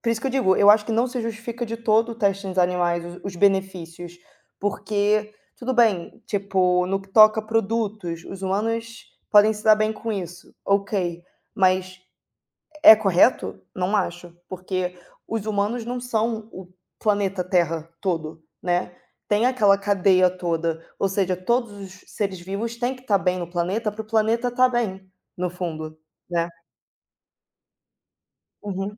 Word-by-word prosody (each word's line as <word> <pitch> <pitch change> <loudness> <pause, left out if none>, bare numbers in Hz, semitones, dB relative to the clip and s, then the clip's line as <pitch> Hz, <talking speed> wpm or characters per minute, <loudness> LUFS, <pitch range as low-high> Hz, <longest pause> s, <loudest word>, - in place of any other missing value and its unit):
por 235 - -3
isso 230 -1 0
que 270 - -1
eu - - -3
digo, 245 -8 +2
eu 205 0 +7
acho 210 0 +4
que 230 - -2
não 235 +3 +2
se 250 0 -4
justifica 230 +1 -5
de 230 +1 -4
todo 225 0 +2
o - - -8
teste 200 -3 0
nos 185 -1 -4
animais, 175 -1 +1 0.2
os 195 - -5
benefícios, 175 -3 -1 0.4
porque 210 +1 0 0.2
tudo 255 +1 -3
bem, 220 -8 +1
tipo, 185 -3 +1
no 195 +1 -1
que 195 - -19
toca 215 +2 +6
produtos, 215 -5 -2
os 195 - -9
humanos 225 +4 -2 0.2
podem 210 +1 +6
se 210 0 -9
dar 215 -1 +7
bem 215 +1 0
com 225 0 -5
isso, 175 -3 -7
ok, 195 -4 -1 0.3
mas, 185 -2 +1 0.8
é 220 - +11
correto? 205 +2 +2 0.2
Não 185 +2 -1
acho! 175 -3 -3
Porque 185 -1 -4 0.3
os 225 -2 -3
humanos 215 +3 -1
não 245 +1 -3
são 225 -2 -2
o 185 -1 -10 0.3
planeta 200 -3 0
Terra 165 -3 0
todo, 165 -4 -3 0.2
né, 180 0 -1 0.3
tem 210 +3 +2
aquela 210 -6 +4
cadeia 190 -2 +3
toda, 165 -2 -3
ou 195 - +1
seja 190 -1 0
todos 235 +5 -1
os 195 -2 -11
seres 195 -3 -3
vivos 200 +6 -4
têm 245 +2 -2
que 255 - -16
tá 210 -6 +2
bem 185 -1 0
no 175 -1 -5
planeta 185 +6 -1
para 210 +2 -6
o - - -13
planeta 225 +2 +1
tá 255 +1 +4
bem, 195 -6 -3 0.3
no 180 0 -1
fundo, 160 -3 -6 0.3
né? 170 -1 0 2.1
Uhum. 200 0 -5
200 Hz, 155 wpm, -23 LUFS, 180-220 Hz, 2.1 s, é